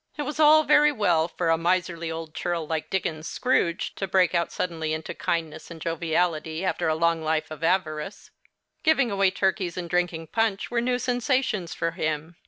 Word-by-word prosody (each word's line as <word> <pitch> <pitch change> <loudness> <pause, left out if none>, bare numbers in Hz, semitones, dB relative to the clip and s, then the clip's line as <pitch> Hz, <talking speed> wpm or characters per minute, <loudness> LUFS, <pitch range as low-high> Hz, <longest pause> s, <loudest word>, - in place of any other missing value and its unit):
It 295 - -2
was 295 +1 -5
all 310 0 +7
very 300 0 +5
well 175 - +2
for 170 -1 -2
a 165 - +2
miserly 170 -1 0
old 160 -1 -6
churl 170 -2 -2
like 160 0 -3
Dickens's 160 -4 -2
Scrooge 205 -8 0
to 195 - -2
break 185 -2 +3
out 170 -1 0
suddenly 160 -3 -2
into 155 0 -4
kindness 160 -2 -3
and 165 -1 -9
joviality, 165 0 -1
after 185 - 0
a 155 - +2
long 165 0 +1
life 155 0 -1
of 155 0 -8
avarice. 165 +1 -1 0.5
Giving 275 -7 +3
away 195 -1 +3
turkeys 190 -2 -1
and 175 -1 -4
drinking 175 -2 -1
punch 225 -3 0
were 235 -1 +1
new 245 +1 +1
sensations 245 - -1
for 165 - -1
him. 155 0 -3
170 Hz, 185 wpm, -25 LUFS, 160-200 Hz, 0.5 s, all